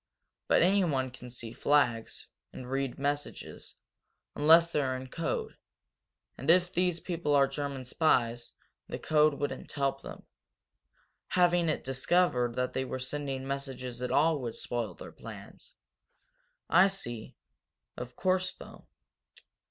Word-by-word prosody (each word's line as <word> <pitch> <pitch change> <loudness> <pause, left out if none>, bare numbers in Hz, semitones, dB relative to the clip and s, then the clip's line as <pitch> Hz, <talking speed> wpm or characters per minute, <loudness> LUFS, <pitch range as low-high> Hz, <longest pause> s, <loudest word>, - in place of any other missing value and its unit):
But - - +4
anyone 170 -9 +2
can 125 0 -11
see 120 -2 -7
flags, 125 -6 +1 0.3
and 125 0 -9
read 135 -1 -1
messages, 145 +1 -4 0.6
unless 165 +3 +6
they're 135 -4 0
in 130 0 -8
code. 165 +3 -3 0.8
And 135 - -4
if 180 +1 +4
these 180 -1 +1
people 170 -5 -1
are 140 -1 +5
German 135 -1 -4
spies, 120 -4 +1 0.4
the - - -4
code 155 -1 +3
wouldn't 145 0 -4
help 135 -1 -1
them. - - -10 1.0
Having 175 -2 +3
it 155 - -1
discovered 130 -2 +1
that 125 0 -1
they 130 - -1
were 130 - -4
sending 135 0 -4
messages 135 -3 -4
at 125 - -2
all 155 +1 +3
would 120 -3 -4
spoil 120 -2 -3
their - - -10
plans." - - -12 0.9
"I 185 +2 +6
see. 120 - -3 0.6
Of 125 0 -7
course, 185 0 0
though. - - -13
140 Hz, 130 wpm, -30 LUFS, 125-165 Hz, 1.0 s, unless